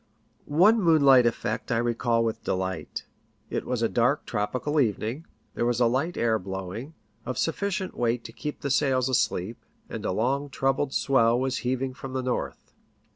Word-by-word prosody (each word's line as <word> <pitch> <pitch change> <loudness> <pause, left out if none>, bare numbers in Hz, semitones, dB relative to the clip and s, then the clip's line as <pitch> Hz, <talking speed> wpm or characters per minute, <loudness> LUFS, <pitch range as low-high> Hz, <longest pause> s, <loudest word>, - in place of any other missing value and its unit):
One 195 +10 +4
moonlight 140 -8 +6
effect 120 - -2
I 115 - +2
recall 120 0 +1
with 115 - -3
delight. 95 -3 -3 0.5
It - - -3
was 125 -2 -1
a - - +4
dark, 125 +6 +1
tropical 125 +8 -1
evening; 120 - -1 0.3
there - - -2
was 120 0 +1
a 120 - +4
light 135 +9 0
air 115 -1 +2
blowing, 95 - -6 0.3
of 125 -1 -4
sufficient 190 +3 -1
weight 120 0 0
to - - -10
keep 150 -1 -6
the 140 - -2
sails 130 -2 +2
asleep, 115 -4 -1 0.3
and - - -6
a - - -1
long 135 +8 0
troubled 135 +1 0
swell 120 -3 +3
was 130 0 -1
heaving 130 +1 -2
from 130 0 -8
the 130 -1 -2
north. 125 -1 -4
125 Hz, 170 wpm, -26 LUFS, 115-140 Hz, 0.5 s, moonlight